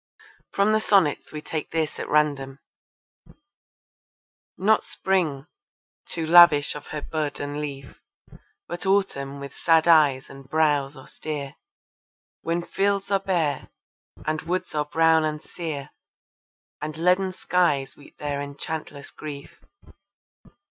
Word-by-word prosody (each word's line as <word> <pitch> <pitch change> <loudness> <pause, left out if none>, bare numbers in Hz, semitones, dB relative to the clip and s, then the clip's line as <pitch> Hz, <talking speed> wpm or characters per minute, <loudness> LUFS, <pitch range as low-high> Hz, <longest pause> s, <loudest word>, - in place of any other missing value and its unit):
From 200 +2 +2
the 215 - +4
sonnets 195 -9 +2
we 150 - -6
take 155 -2 -4
this 160 -2 -2
at - - -5
random: 140 -3 +1 2.0
Not 215 +3 +3
Spring 160 -8 -1 0.6
too 165 -1 -3
lavish 160 -3 +7
of 150 - -9
her 150 -1 -5
bud 155 -2 -3
and 145 +1 -4
leaf 140 -2 -7 0.7
But 175 +2 -5
Autumn 140 -9 0
with 140 -1 -8
sad 165 0 +3
eyes 150 -5 +5
and 135 -1 -13
brows 150 -3 +1
austere, 140 +1 -6 0.9
When 170 +1 -1
fields 200 +2 -1
are 195 - +3
bare, 165 -8 -1 0.6
and 155 0 -1
woods 180 +3 -3
are 150 -1 0
brown 160 +1 +3
and 155 -1 -1
sere, 150 -4 -6 0.9
And 155 0 -5
leaden 180 +3 +2
skies 175 -7 0
weep 145 - -18
their 145 -1 -3
enchantless 145 0 -6
grief. 145 -2 -9
155 Hz, 120 wpm, -25 LUFS, 145-175 Hz, 2.0 s, lavish